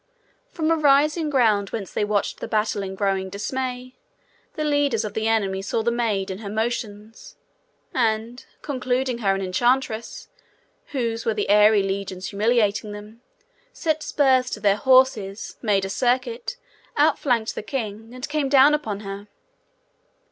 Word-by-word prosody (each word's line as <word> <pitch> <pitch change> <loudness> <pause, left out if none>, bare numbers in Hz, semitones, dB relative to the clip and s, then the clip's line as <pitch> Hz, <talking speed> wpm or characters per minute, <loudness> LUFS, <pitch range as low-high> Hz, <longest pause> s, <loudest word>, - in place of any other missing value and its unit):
From 325 -7 -1
a - - +4
rising 300 +1 +3
ground 220 -8 +2
whence 200 -5 -6
they - - 0
watched 205 -1 -1
the - - -5
battle 215 -2 0
in 190 -1 -5
growing 195 -1 -1
dismay, 250 +5 -4 0.6
the 310 - -2
leaders 290 -7 +1
of 210 - -5
the 220 0 -1
enemy 200 -4 0
saw 220 +3 -2
the 235 - +1
maid 215 -5 -1
and 190 +3 -7
her 200 - -6
motions, 220 0 -4 0.6
and, 230 0 -1 0.2
concluding 255 -2 -1
her 195 -4 +1
an 195 - -3
enchantress, 240 - -1 0.6
whose 230 -4 -2
were 225 - 0
the - - -2
airy 210 0 +6
legions 195 -1 -4
humiliating 210 -1 +1
them, 210 +3 -11 0.5
set 315 -2 -1
spurs 260 -4 +2
to - - -5
their 200 -1 +3
horses, 230 -5 +2
made 200 -4 +1
a - - -4
circuit, 245 - -1 0.4
outflanked 235 -5 +2
the - - -5
king, 220 -2 -5
and 255 +1 -6
came 295 -2 -1
down 275 +2 +6
upon 220 -10 -2
her. 200 0 -7
225 Hz, 150 wpm, -23 LUFS, 205-260 Hz, 0.6 s, airy